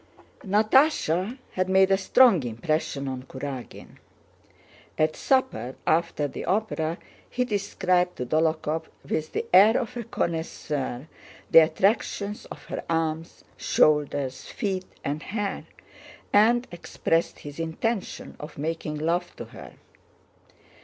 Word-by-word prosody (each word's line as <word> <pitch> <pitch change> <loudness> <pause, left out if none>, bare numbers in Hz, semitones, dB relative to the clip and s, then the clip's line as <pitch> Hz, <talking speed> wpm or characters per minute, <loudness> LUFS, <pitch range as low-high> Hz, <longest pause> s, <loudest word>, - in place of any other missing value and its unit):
Natásha 215 - +3
had 185 0 -1
made 190 0 +5
a - - +6
strong 200 - +5
impression 140 +4 -2
on 130 -1 -4
Kurágin. 130 -1 -8 1.0
At 155 0 +2
supper 260 - 0
after 160 -2 +1
the - - -7
opera 180 -5 -1 0.3
he 250 0 0
described 185 -4 0
to 125 - -4
Dólokhov 160 +2 0 0.2
with 155 0 -2
the - - -1
air 205 +5 +7
of 250 -1 -5
a 240 - -4
connoisseur 155 - -3 0.4
the - - +10
attractions 200 +5 +1
of - - -10
her - - -5
arms, 165 0 -2
shoulders, 145 -3 +1
feet, 190 -5 -3 0.2
and 145 +2 -2
hair 205 +1 -3 0.7
and 235 +4 +4
expressed 170 -1 -1
his 145 +1 -9
intention 185 +7 -3
of 150 +1 -9
making 155 0 -3
love 170 +3 -1
to - - -7
her. - - -12
165 Hz, 120 wpm, -26 LUFS, 155-205 Hz, 1.0 s, the